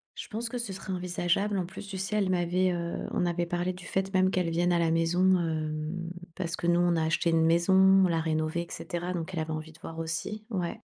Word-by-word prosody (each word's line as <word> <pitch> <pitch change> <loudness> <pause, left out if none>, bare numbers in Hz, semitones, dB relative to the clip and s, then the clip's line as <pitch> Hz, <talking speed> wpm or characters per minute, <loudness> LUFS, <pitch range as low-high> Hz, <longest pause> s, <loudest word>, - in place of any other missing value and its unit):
Je - - -7
pense 230 +1 -3
que 245 +1 -4
ce 220 -5 -4
serait 190 0 -5
envisageable. 180 +3 0
En 180 - 0
plus, 190 +2 -9
tu 195 -1 -5
sais, 195 +3 -2
elle 195 -3 +1
m'avait, 180 +1 +2
heu, 170 -1 -3
on - - +1
avait 175 0 0
parlé 175 +1 -1
du 180 0 -11
fait 190 0 -2
même 185 0 +4
qu'elle 180 -3 0
vienne 175 +2 +2
à 175 - +3
la 165 -1 +2
maison, 165 +2 +2 0.2
hem, 160 +1 -2 0.3
parce 170 -3 -3
que 170 - -3
nous, 175 0 +4
on 175 -1 +3
a 160 - +1
acheté 160 +1 +1
une 165 0 +4
maison, 170 +3 +3
on 190 0 +6
l'a 165 -2 +1
rénovée 155 +1 0
et 170 - -7
cetera, 175 +1 -4
donc 175 +1 -4
elle 170 - -2
avait 160 0 -3
envie 155 0 -5
de 160 - -18
voir 165 - -8
aussi 165 +7 -4
ouais. 185 +1 -2
175 Hz, 250 wpm, -29 LUFS, 165-185 Hz, 0.3 s, on